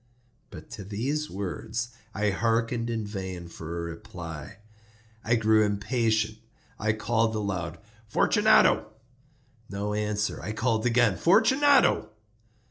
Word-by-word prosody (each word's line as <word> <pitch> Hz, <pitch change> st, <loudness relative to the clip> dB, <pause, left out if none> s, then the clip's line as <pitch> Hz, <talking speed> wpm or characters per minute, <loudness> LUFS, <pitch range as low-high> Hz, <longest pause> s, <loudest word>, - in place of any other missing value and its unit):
But -, -, -12 dB
to 100 Hz, -, -7 dB
these 130 Hz, +10 st, -2 dB
words 110 Hz, +5 st, -4 dB, 0.3 s
I 105 Hz, 0 st, +1 dB
hearkened 115 Hz, +2 st, 0 dB
in 115 Hz, -2 st, -2 dB
vain 95 Hz, -4 st, -6 dB
for 85 Hz, 0 st, -7 dB
a -, -, -2 dB
reply. 85 Hz, +1 st, -9 dB, 0.7 s
I 115 Hz, -, +2 dB
grew 110 Hz, -1 st, +4 dB
impatient. 110 Hz, +1 st, 0 dB, 0.4 s
I 110 Hz, +1 st, +1 dB
called 110 Hz, +1 st, 0 dB
aloud— 90 Hz, -5 st, -3 dB, 0.3 s
"Fortunato!" 110 Hz, -, +4 dB, 0.8 s
No 100 Hz, +1 st, -3 dB
answer. 105 Hz, 0 st, -1 dB
I 110 Hz, -, -4 dB
called 115 Hz, +1 st, 0 dB
again— 115 Hz, -5 st, +3 dB
"Fortunato!" 265 Hz, +10 st, +4 dB
110 Hz, 115 wpm, -27 LUFS, 100-115 Hz, 0.8 s, grew